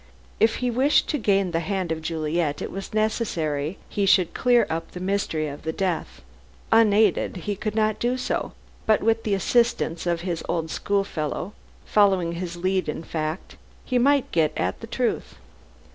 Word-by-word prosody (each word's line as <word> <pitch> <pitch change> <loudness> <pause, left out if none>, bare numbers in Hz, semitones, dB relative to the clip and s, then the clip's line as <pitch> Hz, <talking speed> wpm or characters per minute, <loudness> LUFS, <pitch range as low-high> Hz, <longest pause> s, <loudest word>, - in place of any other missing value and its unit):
If 225 0 +4
he 245 - +1
wished 265 +5 +3
to 300 - 0
gain 195 -4 +2
the 165 - 0
hand 185 0 -2
of 160 0 -2
Juliet, 155 -1 -1
it - - -5
was 195 +1 -6
necessary 175 -8 -1
he 200 -1 -1
should 185 -3 +4
clear 245 -1 +4
up 165 +1 -3
the 180 - -8
mystery 185 -5 -1
of 145 0 -7
the 160 - -2
death. 165 - -3 0.5
Unaided, 215 -4 +4
he 205 - -1
could 215 +2 -4
not 215 -1 +1
do 245 +2 0
so, 255 - -2 0.3
but 215 -1 +3
with 225 0 +2
the 205 -2 +1
assistance 230 -5 +1
of 170 -1 0
his 175 -2 -3
old 160 -2 -1
schoolfellow 195 -2 -2 0.3
following 190 -5 +3
his 170 0 -5
lead 185 -1 0
in 155 - -4
fact 155 +2 -4 0.3
he 250 -1 +1
might 280 +2 +3
get 160 -2 +2
at 90 +1 -1
the - - -7
truth. - - -2
190 Hz, 175 wpm, -24 LUFS, 165-215 Hz, 0.5 s, If